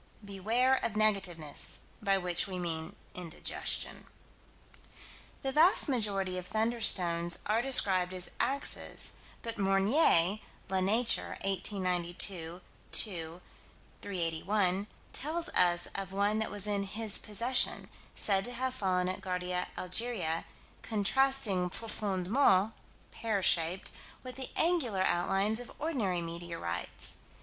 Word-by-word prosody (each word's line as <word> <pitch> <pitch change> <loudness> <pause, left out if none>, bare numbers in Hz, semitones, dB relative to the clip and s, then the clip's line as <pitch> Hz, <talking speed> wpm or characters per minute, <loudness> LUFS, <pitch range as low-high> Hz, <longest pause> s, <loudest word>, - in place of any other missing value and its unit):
Beware 220 +7 0
of 225 - -2
negativeness, 190 -8 -1 0.2
by 195 -2 +1
which 180 -1 -1
we 185 -2 -6
mean 165 -2 -5 0.2
indigestion. 175 -2 -2 1.4
The 270 - -2
vast 325 +7 +4
majority 200 -8 0
of 180 - -11
"thunderstones" 190 -6 +2
are 215 +3 +1
described 190 -8 +4
as 185 -1 -5
"axes," 280 +1 -2 0.3
but 230 -2 -6
Meunier 195 - +2 0.3
(La 190 - +1
Nature, 225 +5 +1
1892 180 -2 -1 0.3
2 170 -4 0 0.6
381) 190 +2 -1 0.3
tells 330 +4 -3
of 180 +2 +1
one 205 +2 0
that 220 - -2
was 205 -1 -1
in 205 -1 -1
his 210 +2 -2
possession; 230 +5 +1 0.3
said 195 -2 +1
to 245 - -4
have 255 +1 -3
fallen 185 -6 -1
at 185 +1 -4
Ghardia, 180 -1 -3
Algeria, 180 -4 0 0.4
contrasting 220 -3 +1
"profoundment" 205 +1 0 0.4
(pear 215 -4 -3
shaped) 175 0 +1 0.3
with 255 -1 -8
the 265 -1 -6
angular 275 - +1
outlines 195 +5 0
of 245 - -9
ordinary 215 - -2
meteorites. 165 - +4
195 Hz, 110 wpm, -30 LUFS, 180-225 Hz, 1.4 s, vast